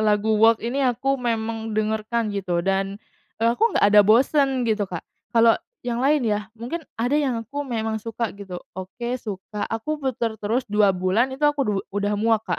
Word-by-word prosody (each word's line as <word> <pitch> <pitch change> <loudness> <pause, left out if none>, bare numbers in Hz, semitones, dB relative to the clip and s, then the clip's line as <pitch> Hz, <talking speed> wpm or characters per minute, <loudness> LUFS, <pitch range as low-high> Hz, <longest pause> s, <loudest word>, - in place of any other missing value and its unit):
lagu 215 0 +2
Walk 225 0 +6
ini 255 +5 -2
aku 260 +2 +1
memang 225 -3 -2
dengarkan 215 0 -1
gitu 185 -3 -1
dan, 195 +1 0 0.4
eee, 230 +1 +3
aku 455 - +2
nggak - - +3
ada 210 - +10
bosen 260 +4 +3
gitu, 215 -3 0
Kak. 175 -2 -6 0.2
Kalau 230 -1 +5 0.3
yang 240 -1 -2
lain 285 -1 +3
ya, 210 -1 -1
mungkin 245 +9 -4 0.2
ada 245 +4 0
yang 275 -5 +1
aku 285 +6 -5
memang 225 -4 -2
suka 230 0 -3
gitu, 200 -3 -8 0.2
oke 190 +6 -6
suka, 210 0 -6
aku 295 +7 -3
puter 240 -4 -1
terus 230 +5 0
2 210 -1 +3
bulan 185 +8 +2
itu 270 +3 -3
aku 295 -1 +3
du - - +2 0.2
udah 205 +1 0
muak, 220 0 +2
Kak, - - -2
225 Hz, 185 wpm, -23 LUFS, 210-250 Hz, 0.4 s, ada